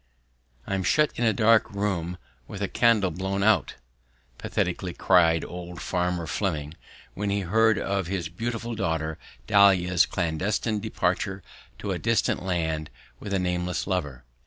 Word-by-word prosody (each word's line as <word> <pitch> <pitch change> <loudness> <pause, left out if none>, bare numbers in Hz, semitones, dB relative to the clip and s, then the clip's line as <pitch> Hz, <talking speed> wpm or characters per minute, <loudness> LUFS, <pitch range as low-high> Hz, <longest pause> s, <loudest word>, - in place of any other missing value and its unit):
"I'm 95 -1 -1
shut 150 +10 +3
in 120 - 0
a 110 - +4
dark 110 0 +4
room 95 -4 -2 0.3
with 100 - -8
the 100 - 0
candle 110 -6 +3
blown 95 +3 -2
out," 110 0 +3 0.6
pathetically 90 0 -2
cried 85 -3 +4
old 90 0 -8
Farmer 90 -1 -1
Fleming, 75 -2 -2 0.4
when 105 +1 -3
he 100 0 0
heard 110 +4 +3
of 100 -2 -1
his 90 -3 -2
beautiful 115 +6 -4
daughter 80 -5 -2 0.3
Dahlia's 90 -2 +4
clandestine 95 +6 -1
departure 95 -2 -2 0.3
to - - -4
a - - -2
distant 115 -4 +1
land 80 -4 -2 0.3
with 100 - -7
a 100 - +2
nameless 90 -1 -1
lover. 75 -10 -3
95 Hz, 140 wpm, -26 LUFS, 85-105 Hz, 0.6 s, a